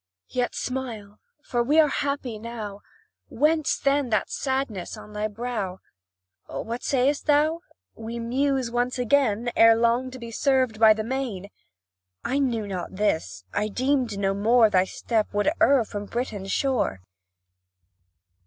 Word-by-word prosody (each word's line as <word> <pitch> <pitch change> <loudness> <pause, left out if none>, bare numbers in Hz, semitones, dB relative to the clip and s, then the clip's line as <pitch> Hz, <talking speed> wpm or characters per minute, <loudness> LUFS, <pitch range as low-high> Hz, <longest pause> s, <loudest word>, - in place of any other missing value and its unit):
Yet 250 -1 -1
smile 230 -6 -5 0.2
for 240 - -1
we 290 +7 +3
are 310 - +6
happy 280 -6 -2
now. 215 -3 -7 0.5
Whence, 310 +1 +1
then, 275 -2 +1
that 215 -2 0
sadness 265 -9 -2
on 210 - -12
thy 210 +1 -1
brow? 215 -4 -4 0.7
What 230 - -5
sayst 275 +3 +1
thou?" 305 +2 +3 0.3
We 225 +1 -7
muse 260 +1 0
once 245 +1 0
again, 240 -2 +2
Ere 225 0 +7
long, 235 +3 +1
be 245 -3 -8
severed 255 -3 +1
by 220 -1 +7
the 215 - -3
main!" 230 -6 -4 0.7
I 270 +3 0
knew 235 -6 0
not 190 -1 -5
this 160 - -1
I 210 - 0
deemed 250 -1 0
no 195 -1 +1
more 220 +2 +4
Thy 185 -1 +4
step 220 +2 -1
would 205 +8 +2
err 270 -4 +5
from 205 -1 -6
Britain's 205 -4 -4
shore. 255 - 0
235 Hz, 140 wpm, -25 LUFS, 210-265 Hz, 0.7 s, Ere